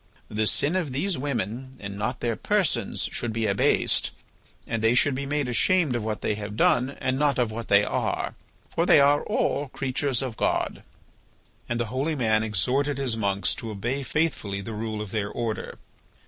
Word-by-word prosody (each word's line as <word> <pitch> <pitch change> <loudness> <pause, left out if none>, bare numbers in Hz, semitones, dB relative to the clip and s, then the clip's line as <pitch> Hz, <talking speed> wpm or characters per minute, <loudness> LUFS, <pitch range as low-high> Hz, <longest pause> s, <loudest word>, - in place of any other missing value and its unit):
The 110 0 0
sin 150 - +2
of 165 -8 -1
these 180 +7 0
women 130 -1 -3
and 100 -1 -6
not 110 +5 -3
their 115 -2 0
persons 170 - 0
should 120 - -2
be 110 0 -1
abased, 100 -1 +2 0.6
and 115 -1 -2
they 115 +2 +4
should 145 +2 +4
be 140 +2 -3
made 145 -1 0
ashamed 150 +3 +3
of 120 - -1
what 110 -1 -3
they - - 0
have 105 0 -5
done 130 +4 +3
and 130 +1 0
not 145 -3 +2
of 120 -3 +1
what 115 +1 -5
they 100 0 +5
are, - - -1 0.3
for - - 0
they - - +7
are 145 +1 +5
all 145 +1 0
creatures 135 0 -1
of 125 -4 -5
God." - - 0 0.9
And 120 0 -1
the 120 - +1
holy 145 +5 0
man 110 -5 +2
exhorted 130 +7 +1
his 130 -4 0
monks 100 -2 0
to 115 - -6
obey 120 +7 -2
faithfully 130 -10 -1
the 110 +3 -6
rule 110 0 -3
of 100 - -9
their 105 -2 -1
order. 115 -1 -4
120 Hz, 190 wpm, -26 LUFS, 110-140 Hz, 0.9 s, they